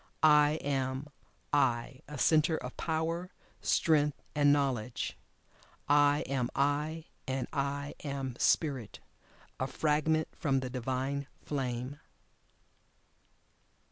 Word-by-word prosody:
I 150 Hz, -1 st, +6 dB
am 135 Hz, 0 st, -1 dB, 0.4 s
"I" 130 Hz, -2 st, +1 dB
a 150 Hz, 0 st, -7 dB
Centre 155 Hz, +2 st, +4 dB
of 125 Hz, -3 st, -7 dB
Power, 165 Hz, +2 st, -1 dB, 0.3 s
Strength, 150 Hz, -3 st, +2 dB
and 145 Hz, -1 st, +4 dB
Knowledge. 130 Hz, -5 st, 0 dB, 0.7 s
I 145 Hz, 0 st, +5 dB
am 130 Hz, -3 st, -1 dB
"I" 150 Hz, +3 st, 0 dB, 0.2 s
and 130 Hz, -1 st, -1 dB
"I" 140 Hz, +1 st, -2 dB
am 135 Hz, -3 st, -3 dB
Spirit, 135 Hz, -, +1 dB, 0.6 s
a 130 Hz, -, 0 dB
fragment 155 Hz, +2 st, +1 dB
from 135 Hz, -4 st, +1 dB
the 130 Hz, -1 st, -4 dB
Divine 130 Hz, +3 st, -2 dB, 0.2 s
Flame. 130 Hz, 0 st, -3 dB
140 Hz, 100 wpm, -31 LUFS, 130-150 Hz, 0.7 s, I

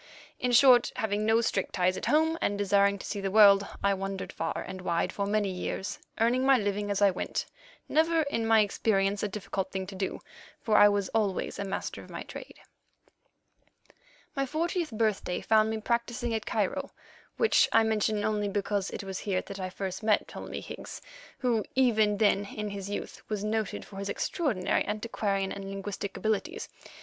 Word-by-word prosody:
In 250 Hz, -, 0 dB
short, 245 Hz, 0 st, +6 dB
having 215 Hz, -2 st, -1 dB
no 225 Hz, +1 st, +4 dB
strict 200 Hz, -4 st, -1 dB
ties 185 Hz, 0 st, +2 dB
at -, -, -4 dB
home, 320 Hz, +2 st, +3 dB
and 200 Hz, -, 0 dB
desiring 200 Hz, 0 st, +3 dB
to -, -, -9 dB
see 200 Hz, -, -4 dB
the 195 Hz, -, -1 dB
world, 200 Hz, -1 st, +7 dB, 0.2 s
I 200 Hz, 0 st, +4 dB
wandered 195 Hz, 0 st, -4 dB
far -, -, -3 dB
and 190 Hz, -1 st, -7 dB
wide 170 Hz, -2 st, -1 dB
for 200 Hz, -1 st, -2 dB
many 205 Hz, -1 st, +1 dB
years, 185 Hz, +1 st, -4 dB, 0.2 s
earning 240 Hz, +3 st, +3 dB
my 270 Hz, 0 st, +6 dB
living 205 Hz, -1 st, -1 dB
as 200 Hz, 0 st, +1 dB
I 200 Hz, -, +6 dB
went, 180 Hz, -, -3 dB, 0.4 s
never, 325 Hz, +1 st, +3 dB
in 230 Hz, -6 st, -2 dB
my 225 Hz, -1 st, +6 dB
experience, 200 Hz, -1 st, +1 dB
a -, -, 0 dB
difficult 195 Hz, -1 st, -4 dB
thing 190 Hz, -1 st, -3 dB
to 195 Hz, -, -9 dB
do, 190 Hz, 0 st, -3 dB, 0.4 s
for 215 Hz, -, 0 dB
I 205 Hz, -, +8 dB
was 200 Hz, -1 st, 0 dB
always 210 Hz, -4 st, -1 dB
a -, -, -1 dB
master 195 Hz, -1 st, -4 dB
of -, -, -15 dB
my -, -, -6 dB
trade. -, -, -10 dB, 1.8 s
My 275 Hz, -1 st, 0 dB
fortieth 335 Hz, +3 st, -1 dB
birthday 215 Hz, -5 st, -1 dB
found 220 Hz, 0 st, +3 dB
me 220 Hz, 0 st, -2 dB
practising 235 Hz, +1 st, -1 dB
at 220 Hz, -, -3 dB
Cairo, -, -, -1 dB, 0.5 s
which 455 Hz, -, +4 dB
I 225 Hz, -, +5 dB
mention 215 Hz, -1 st, +1 dB
only 210 Hz, -1 st, 0 dB
because 200 Hz, 0 st, -1 dB
it -, -, -6 dB
was 190 Hz, -1 st, -5 dB
here 190 Hz, -3 st, -1 dB
that 190 Hz, -2 st, -6 dB
first 195 Hz, +1 st, -4 dB
I -, -, -5 dB
met 210 Hz, -, +3 dB
Ptolemy -, -, -7 dB
Higgs, -, -, -9 dB, 0.3 s
who, 235 Hz, -4 st, +1 dB
even 220 Hz, -5 st, +3 dB
then 205 Hz, -1 st, +3 dB
in 210 Hz, +1 st, -5 dB
his 200 Hz, -1 st, -6 dB
youth, 205 Hz, -, -5 dB
was 210 Hz, -2 st, -2 dB
noted 215 Hz, -1 st, -2 dB
for 195 Hz, -, -12 dB
his 200 Hz, 0 st, -4 dB
extraordinary 205 Hz, -, 0 dB
antiquarian 205 Hz, -2 st, -2 dB
and 195 Hz, -1 st, -6 dB
linguistic 195 Hz, 0 st, -5 dB
abilities. 220 Hz, -, -2 dB
205 Hz, 185 wpm, -29 LUFS, 195-225 Hz, 1.8 s, I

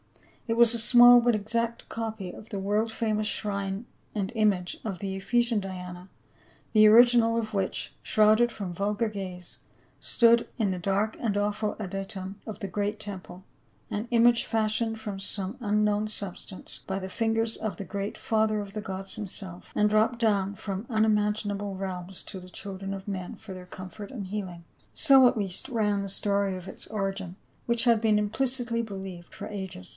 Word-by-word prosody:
It 230 Hz, 0 st, 0 dB
was 235 Hz, -1 st, +7 dB
a 235 Hz, -, +2 dB
small 245 Hz, +1 st, +8 dB
but 240 Hz, -1 st, +3 dB
exact 230 Hz, +3 st, -2 dB
copy 220 Hz, -5 st, -4 dB
of 215 Hz, -, -12 dB
the 200 Hz, -, -4 dB
world 210 Hz, +3 st, 0 dB
famous 215 Hz, -1 st, 0 dB
shrine 200 Hz, 0 st, -2 dB, 0.3 s
and 200 Hz, 0 st, -1 dB
image 205 Hz, -5 st, +1 dB
of 195 Hz, -4 st, -3 dB
the 195 Hz, -1 st, -3 dB
Ephesian 235 Hz, +2 st, +1 dB
Diana, 180 Hz, -1 st, -7 dB, 0.6 s
the 215 Hz, 0 st, +7 dB
original 230 Hz, 0 st, +6 dB
of 220 Hz, -1 st, -3 dB
which, 195 Hz, -2 st, -1 dB
shrouded 220 Hz, +2 st, +4 dB
from 195 Hz, -5 st, -5 dB
vulgar 205 Hz, +5 st, 0 dB
gaze, 185 Hz, -4 st, -7 dB, 0.4 s
stood 235 Hz, -1 st, +4 dB
in 210 Hz, -5 st, +1 dB
the 185 Hz, -, -3 dB
dark 200 Hz, +4 st, 0 dB
and 210 Hz, -4 st, 0 dB
awful 210 Hz, +1 st, -1 dB
adytum 195 Hz, -1 st, -5 dB
of 215 Hz, -3 st, -7 dB
the 200 Hz, -, -4 dB
great 205 Hz, +3 st, -2 dB
temple; 190 Hz, -2 st, -8 dB, 0.4 s
an 215 Hz, +3 st, -3 dB
image 235 Hz, 0 st, +5 dB
fashioned 225 Hz, 0 st, 0 dB
from 205 Hz, -3 st, -5 dB
some 195 Hz, +1 st, -2 dB
un 210 Hz, -1 st, +2 dB
known 210 Hz, 0 st, +1 dB
substance 200 Hz, -2 st, -7 dB
by 190 Hz, -, -2 dB
the 190 Hz, -, -5 dB
fingers 225 Hz, +2 st, 0 dB
of 220 Hz, -2 st, -4 dB
the 200 Hz, -, -6 dB
great 200 Hz, +1 st, -4 dB
father 215 Hz, -1 st, +1 dB
of 200 Hz, -1 st, -6 dB
the 215 Hz, -, -4 dB
gods 195 Hz, -2 st, -1 dB
himself, 190 Hz, -4 st, -4 dB
and 210 Hz, 0 st, +3 dB
dropped 220 Hz, +3 st, +3 dB
down 200 Hz, -4 st, +1 dB
from 195 Hz, +1 st, -5 dB
unimagin 210 Hz, -2 st, +2 dB
able 200 Hz, -1 st, -4 dB
realms 185 Hz, -1 st, -5 dB
to 190 Hz, -, -7 dB
the 180 Hz, -, -12 dB
children 195 Hz, +1 st, -6 dB
of 195 Hz, 0 st, -7 dB
men 185 Hz, -3 st, -4 dB
for 215 Hz, -3 st, -10 dB
their 180 Hz, -1 st, -10 dB
comfort 190 Hz, +3 st, -9 dB
and 205 Hz, -7 st, -6 dB
healing 185 Hz, -4 st, -5 dB, 0.2 s
— -, -, -31 dB
so 270 Hz, -4 st, +8 dB
at 245 Hz, 0 st, +1 dB
least 195 Hz, -4 st, -2 dB
ran 210 Hz, -4 st, +1 dB
the 200 Hz, -, -4 dB
story 200 Hz, -1 st, 0 dB
of 180 Hz, 0 st, -10 dB
its -, -, -8 dB
origin, 195 Hz, -3 st, -3 dB, 0.3 s
which 235 Hz, 0 st, +2 dB
had 230 Hz, -3 st, +4 dB
been 215 Hz, -2 st, +3 dB
implicitly 240 Hz, +2 st, 0 dB
believed 190 Hz, -5 st, -8 dB
for -, -, -7 dB
ages. 190 Hz, -3 st, -6 dB
205 Hz, 180 wpm, -28 LUFS, 195-225 Hz, 0.6 s, small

